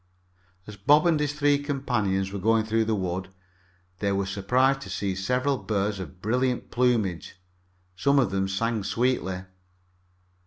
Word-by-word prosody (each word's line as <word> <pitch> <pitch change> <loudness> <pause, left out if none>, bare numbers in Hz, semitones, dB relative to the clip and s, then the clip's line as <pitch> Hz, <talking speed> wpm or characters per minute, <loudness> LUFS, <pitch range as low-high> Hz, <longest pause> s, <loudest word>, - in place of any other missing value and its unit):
As 105 - -9
Bob 145 - +4
and 165 -3 +3
his 145 -1 0
three 145 -1 +2
companions 110 -9 -1
were 100 - -3
going 110 +2 +2
through 110 0 +1
the 110 0 0
wood, 95 -1 -3 0.7
they 100 -1 0
were 100 0 0
surprised 125 +8 +1
to - - -8
see 100 -2 -2
several 125 +8 0
birds 100 -1 -1
of 95 0 -9
brilliant 125 +3 0
plumage. 115 -10 0 0.6
Some 140 +10 +2
of 125 -8 +3
them 95 0 0
sang 110 +2 -1
sweetly. 100 -6 -1
110 Hz, 150 wpm, -26 LUFS, 95-130 Hz, 0.7 s, Bob